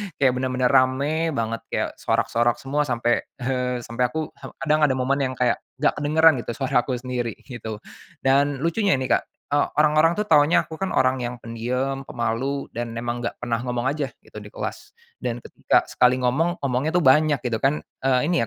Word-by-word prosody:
kayak 135 -2 +3
benar-benar 130 -1 +1
rame 140 +5 +2
banget, 115 -1 -2
kayak - - -1
sorak-sorak 120 +1 +1
semua 145 +2 -2
sampai, 120 -2 +1 0.2
eee, 125 -1 -1
sampai 120 +2 0
aku, 155 +5 -4 0.3
kadang 155 -1 +3
ada 130 - 0
momen 130 +2 0
yang 130 -2 -1
kayak 125 -1 +1 0.2
nggak 145 +3 +1
kedengeran 155 -1 +4
gitu 120 - -4
suara 135 -2 +1
aku 130 - -1
sendiri 125 -2 -3
gitu. 115 -4 -7 0.5
Dan 140 +1 +2
lucunya 170 +1 +2
nih 130 -1 -3
Kak, - - -15 0.3
eee, 145 0 +3
orang-orang 155 +2 +4
tuh 210 - 0
taunya 155 -4 +4
aku 160 - -10
kan 195 - -2
orang 130 0 +3
yang 125 0 -3
pendiam, 125 +4 -3
pemalu, 120 +4 -2
dan 115 0 -5
memang 120 +1 -3
nggak 120 - -3
pernah 115 -1 0
ngomong 125 -1 -1
aja 145 -1 -2 0.2
gitu, - - -10
di - - -11
kelas. - - -7 0.2
Dan 120 -1 -4
ketika - - +1
sekali 125 +1 +3
ngomong, 160 +7 0
ngomongnya 140 +5 0
tuh 175 - +3
banyak 150 +1 +4
gitu, 120 -3 -1
kan, 140 +5 +1 0.2
eee, 130 -1 +2
ini 175 - +2
130 Hz, 185 wpm, -23 LUFS, 125-150 Hz, 0.5 s, kedengeran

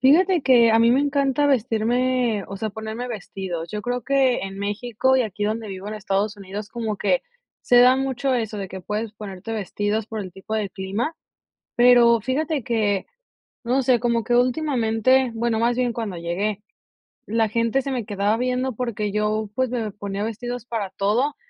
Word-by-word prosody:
Fíjate 335 +5 +4
que 235 -4 +5
a 225 - +5
mí 230 +1 +5
me 260 - +4
encanta 285 0 +1
vestirme, 240 -2 +1
o 195 - -6
sea, 215 +1 -3
ponerme 220 +3 -5
vestidos. 185 -6 -5
Yo 210 0 -4
creo 245 -1 -2
que 270 -1 +2
en 195 0 -6
México 235 +5 0
y 255 - +3
aquí 210 -1 -3
donde 220 0 -2
vivo 190 +1 -7
en 215 - -5
Estados 205 0 -1
Unidos 200 +2 -7
como 225 -3 -3
que - - +1 0.4
se 245 - +4
da 250 +1 +7
mucho 265 0 0
eso, 220 -3 -2
de 195 - -4
que 190 0 -7
puedes 210 +3 -3
ponerte 210 +1 -7
vestidos 210 +1 -2
por 220 -1 -6
el 185 -3 -7
tipo 195 +3 -6
de 205 -3 -2
clima, 200 - -3 0.6
pero 240 -1 +6
fíjate 285 +2 -1
que, 215 -5 0 0.6
no 255 +3 +1
sé, 245 -2 +3
como 235 -2 +1
que 240 - +2
últimamente, 250 -2 +2
bueno, 225 -1 0
más 240 +1 +1
bien 245 -2 +1
cuando 215 -6 -4
llegué, 195 +5 -2 0.7
la 225 0 +1
gente 230 +4 +1
se 275 - -3
me 245 -4 -2
quedaba 205 +1 0
viendo 250 +1 -1
porque 210 -4 -3
yo, 210 0 -1
pues, 260 -2 0
me 225 -5 -2
ponía 200 0 -4
vestidos 240 +1 -5
para 215 -6 -3
todo, 240 +9 0
225 Hz, 185 wpm, -23 LUFS, 205-250 Hz, 0.7 s, da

